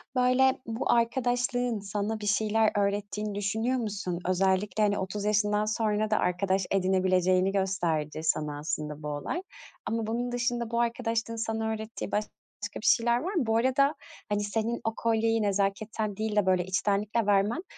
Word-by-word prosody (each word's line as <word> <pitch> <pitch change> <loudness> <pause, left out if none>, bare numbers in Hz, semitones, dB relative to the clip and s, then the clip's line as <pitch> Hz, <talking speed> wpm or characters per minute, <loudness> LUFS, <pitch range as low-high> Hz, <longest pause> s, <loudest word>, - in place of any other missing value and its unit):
böyle, 255 +1 +4
bu 225 +1 -1
arkadaşlığın 245 0 +1
sana 205 +2 -3
bir 210 - -5
şeyler 215 +1 +2
öğrettiğini 205 +1 -1
düşünüyor 220 +5 0
musun? 200 -6 -3
Özellikle, 190 +2 +1
hani, 205 -1 +2
30 195 +2 -3
yaşından 210 0 +2
sonra 215 0 0
da 215 - +3
arkadaş 190 +1 +1
edinebileceğini 185 -1 +2
gösterdi 175 -6 -1
sana 150 -2 0
aslında 150 0 -4
bu - - -4
olay. 150 - -3 0.4
Ama 225 -1 -2
bunun 240 +2 -2
dışında 240 -1 -1
bu 235 - 0
arkadaşlığın 230 -1 -1
sana 225 0 -2
öğrettiği 220 -1 -5
başka 210 0 -1 0.5
bir - - -7
şeyler 235 +1 +4
var 365 +9 -3
mı? 330 -10 +1
Bu 225 0 +3
arada, 265 +5 +3 0.3
hani, 205 0 0
senin 225 +3 -2
o 225 - -1
kolyeyi 225 0 +1
nezaketten 205 +1 -1
değil 215 -1 -2
de, 210 - +3
böyle, 185 -1 +3
içtenlikle 205 +4 0
vermen 205 - +2
210 Hz, 155 wpm, -28 LUFS, 195-230 Hz, 0.5 s, böyle